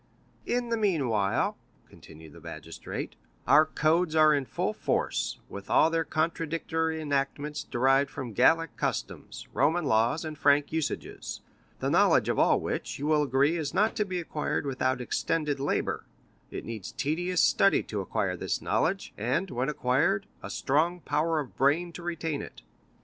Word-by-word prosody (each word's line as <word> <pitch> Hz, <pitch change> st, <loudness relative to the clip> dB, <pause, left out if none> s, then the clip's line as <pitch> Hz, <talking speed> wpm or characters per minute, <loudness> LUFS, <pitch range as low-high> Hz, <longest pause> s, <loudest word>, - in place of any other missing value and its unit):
"In 245 Hz, 0 st, 0 dB
the 230 Hz, -, +1 dB
meanwhile," 130 Hz, -, +1 dB, 0.3 s
continued 80 Hz, -1 st, -14 dB
the -, -, -14 dB
magistrate, -, -, -7 dB, 0.3 s
"our 155 Hz, +2 st, +6 dB
codes 160 Hz, +1 st, +1 dB
are 155 Hz, -1 st, +6 dB
in 140 Hz, -2 st, 0 dB
full -, -, -2 dB
force, -, -, -1 dB
with 100 Hz, 0 st, -9 dB
all 160 Hz, -, +4 dB
their 165 Hz, 0 st, +1 dB
contradictory 160 Hz, 0 st, -1 dB
enactments 145 Hz, 0 st, -2 dB
derived 135 Hz, +3 st, +2 dB
from 130 Hz, -5 st, -6 dB
Gallic 165 Hz, +7 st, +3 dB
customs, -, -, -4 dB
Roman 155 Hz, +4 st, +2 dB
laws, 120 Hz, +6 st, +2 dB
and 155 Hz, -1 st, -5 dB
Frank 145 Hz, 0 st, +3 dB
usages; 160 Hz, -2 st, -4 dB, 0.4 s
the -, -, 0 dB
knowledge -, -, +4 dB
of -, -, 0 dB
all -, -, +4 dB
which, -, -, -4 dB
you 145 Hz, -, -4 dB
will 150 Hz, 0 st, +3 dB
agree, 140 Hz, +4 st, +2 dB
is 155 Hz, -4 st, -3 dB
not 210 Hz, +3 st, +2 dB
to 210 Hz, -, +2 dB
be 185 Hz, -3 st, -3 dB
acquired 155 Hz, -3 st, -2 dB
without 130 Hz, -1 st, 0 dB
extended 150 Hz, +3 st, -1 dB
labor; 140 Hz, -, -1 dB, 0.4 s
it -, -, -6 dB
needs 110 Hz, -3 st, -6 dB
tedious 175 Hz, +4 st, 0 dB
study 195 Hz, -, +4 dB
to 105 Hz, -2 st, -4 dB
acquire 95 Hz, -, -1 dB
this -, -, -2 dB
knowledge, 190 Hz, +4 st, -1 dB
and, 130 Hz, -, -1 dB
when 125 Hz, +3 st, -1 dB
acquired, 150 Hz, +9 st, +1 dB, 0.2 s
a -, -, -7 dB
strong 160 Hz, +6 st, +1 dB
power 155 Hz, +2 st, 0 dB
of 140 Hz, -4 st, -6 dB
brain 155 Hz, +6 st, +2 dB
to 175 Hz, -, -8 dB
retain 165 Hz, -3 st, -3 dB
it." -, -, -11 dB
150 Hz, 160 wpm, -28 LUFS, 135-165 Hz, 0.4 s, our